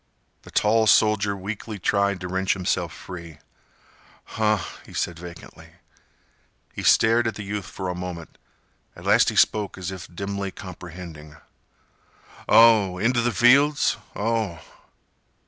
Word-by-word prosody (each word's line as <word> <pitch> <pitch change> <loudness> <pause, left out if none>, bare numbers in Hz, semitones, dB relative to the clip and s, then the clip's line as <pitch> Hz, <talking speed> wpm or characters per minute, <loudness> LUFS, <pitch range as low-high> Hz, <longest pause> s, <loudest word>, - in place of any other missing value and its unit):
The - - -15
tall 110 +1 +2
soldier 105 -2 +3
weakly 105 +2 -6
tried 100 0 0
to 90 - -4
wrench 95 +1 0
himself 95 -2 -2
free. 85 -4 -10 0.9
"Huh," 105 -1 0 0.3
he - - -14
said 85 -2 -2
vacantly. 85 0 -12 1.0
He - - -6
stared 115 +1 +4
at 115 - -3
the 105 - -6
youth 100 -2 -5
for 95 +2 -6
a 90 - -2
moment. 90 -2 -8 0.6
At - - -13
last - - +4
he - - -5
spoke 105 -3 +2
as 95 0 -5
if 95 -2 -8
dimly 100 +2 -4
comprehending. 85 -4 -10 1.1
"Oh! 110 -5 +6
Inteh 120 +3 +2
th' 115 - -6
fields? 140 +8 +4 0.2
Oh!" 110 -5 -1
100 Hz, 130 wpm, -24 LUFS, 90-110 Hz, 1.1 s, Oh